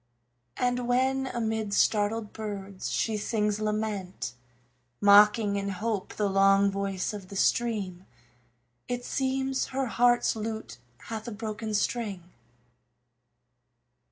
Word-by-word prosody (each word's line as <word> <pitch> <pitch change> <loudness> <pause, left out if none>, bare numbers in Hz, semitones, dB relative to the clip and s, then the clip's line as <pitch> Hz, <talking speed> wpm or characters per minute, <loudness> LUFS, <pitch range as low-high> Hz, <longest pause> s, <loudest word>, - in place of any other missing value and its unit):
And 245 0 0
when 265 +2 +2
amid 220 -4 -2
startled 210 0 +1
birds 200 -3 -5
she 220 -2 0
sings 210 -1 0
lament, 210 - -2 0.7
Mocking 205 0 +6
in 200 0 -2
hope 205 +1 -3
the 210 - +1
long 195 0 +4
voice 195 0 -2
of 200 -3 -7
the 200 - -9
stream, 195 -5 0 0.8
It 245 0 -3
seems 265 0 0
her 270 0 -1
heart's 240 0 +3
lute 220 - -5 0.2
hath 220 0 -6
a - - -4
broken 215 0 -4
string. 205 -3 -1
215 Hz, 110 wpm, -28 LUFS, 200-235 Hz, 0.8 s, Mocking